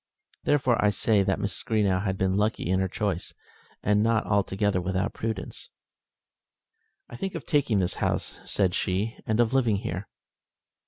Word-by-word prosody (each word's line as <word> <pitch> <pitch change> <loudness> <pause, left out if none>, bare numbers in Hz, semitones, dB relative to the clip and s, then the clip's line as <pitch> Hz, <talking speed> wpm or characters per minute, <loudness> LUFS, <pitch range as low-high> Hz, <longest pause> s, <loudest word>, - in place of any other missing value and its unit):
Therefore, 130 -5 +2
I 105 - +5
say 105 +1 +2
that 95 0 +1
Mrs. 100 -3 -3
Greenow 100 -4 +1
had 95 -2 -1
been 95 0 +1
lucky 105 -3 0
in 95 +1 +2
her 95 - +1
choice, 95 -2 -3 0.5
and 105 +1 +3
not 115 0 +2
altogether 100 -1 +1
without 95 +3 -1
prudence. 110 -3 -5 1.4
"I - - -10
think 195 +9 -4
of - - -5
taking 145 -8 +2
this 90 -2 +1
house," - - -1
said 95 -3 +1
she, 100 +6 -1
"and 110 +1 +1
of 120 +1 +3
living 120 -6 +3
here." 95 0 -4
105 Hz, 160 wpm, -27 LUFS, 95-110 Hz, 1.4 s, I